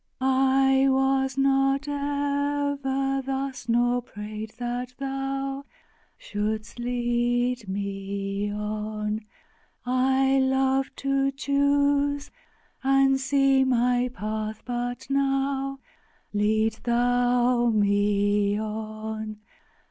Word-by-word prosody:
2. 260 - -2
I 265 0 +4
was 265 0 +1
not 270 +1 +2
ever 285 -1 -1
thus, 265 -2 -4
nor 240 +1 +2
prayed 215 -1 -7
that 245 +1 -4
Thou 270 0 -3 0.5
Shouldst 215 +2 -4
lead 240 -1 0
me 200 +1 -3
on! 210 +1 -3 0.6
I 265 +2 +2
loved 265 0 +1
to 275 0 +1
choose 285 +1 +1 0.5
and 270 0 +4
see 270 0 +3
my 250 -1 +2
path; 215 -1 -4
but 245 0 -3
now 275 0 0 0.6
Lead 215 +1 +1
Thou 245 0 +2
me 205 -1 +2
on! 215 0 -5
250 Hz, 85 wpm, -26 LUFS, 220-270 Hz, 0.6 s, I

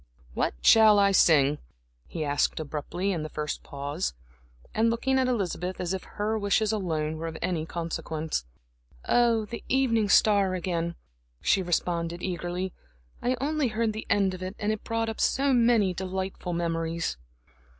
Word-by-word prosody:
"What - - -1
shall 220 -2 +7
I 200 -1 +5
sing?" 150 -6 +4 0.5
he 160 -2 -4
asked 145 +2 +1
abruptly, 155 +5 -3
in 170 -4 -2
the 155 - -5
first 150 -1 -4
pause, 140 - -4 0.6
and 225 +1 +3
looking 265 +3 +1
at 260 - +2
Elizabeth 185 -6 -2
as 180 0 -2
if 190 - -4
her 215 +1 -2
wishes 205 +1 +2
alone 160 -7 -2
were 165 +1 -4
of 160 0 -6
any 165 -3 -2
consequence. 160 - -3 0.6
"Oh, 235 -2 +3
the 235 +3 -7
Evening 230 -6 +2
Star 200 -2 +4
again," 170 -2 -2 0.4
she 195 - +2
responded 170 -1 -1
eagerly. 180 0 -3 0.5
"I 250 +1 0
only 295 0 0
heard 225 -1 0
the 215 - -6
end 200 -2 +2
of 185 - -8
it, 185 +2 -5
and 210 +1 -1
it 215 - -4
brought 225 0 -1
up 225 - -4
so 275 0 +2
many 230 -6 +4
delightful 185 0 -4
memories." 165 - -2
185 Hz, 160 wpm, -27 LUFS, 165-220 Hz, 0.6 s, shall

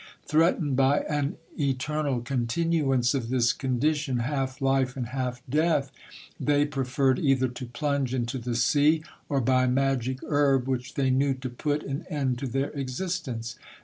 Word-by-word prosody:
Threatened 155 -2 +2
by 135 +2 +3
an 145 -1 -2 0.2
eternal 140 -1 0
continuance 135 +1 +1
of 125 -5 -2
this 120 -2 +3
condition, 140 +1 0
half 130 +1 -2
life, 135 -1 +1
and 120 -3 -3
half 125 -1 -3
death, 150 0 +1 0.5
they 145 0 +2
preferred 135 -2 +1
either 135 -3 +2
to 125 0 -7
plunge 140 0 -1
into 130 0 -2
the 120 0 -3
sea, 145 +6 +3 0.3
or 140 - +1
by 130 +1 +3
magic 130 -1 +1
herb 140 -3 +2
which 130 -1 -3
they 135 -2 +2
knew 135 +1 +2
to 130 -1 -6
put 145 +4 -1
an 140 +4 -5
end 135 -5 -1
to 135 - -3
their 135 +3 -1
existence. 130 - -4
135 Hz, 150 wpm, -27 LUFS, 125-145 Hz, 0.5 s, by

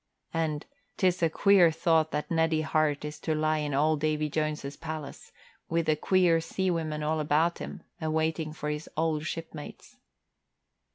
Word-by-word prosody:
And, 160 -2 -1 0.3
"'Tis 180 -2 +2
a 165 - +4
queer 190 +1 +5
thought 160 0 +2
that 150 - -3
Neddie 160 -1 +2
Hart 155 -2 +1
is 150 0 -6
to 155 +1 -1
lie 155 0 +1
in 145 -2 -2
old 155 +2 +2
Davy 155 0 0
Jones's 150 -2 -2
palace, 155 -3 -7 0.4
with 165 0 +1
the 155 - +3
queer 170 0 +3
sea 190 +3 -1
women 155 -3 -2
all 155 +1 0
about 155 +3 +2
him, - - -7 0.2
awaiting 160 0 0
for 150 -1 -4
his 150 +1 -5
old 155 -1 0
shipmates." 165 -3 -8
155 Hz, 160 wpm, -28 LUFS, 150-165 Hz, 0.4 s, queer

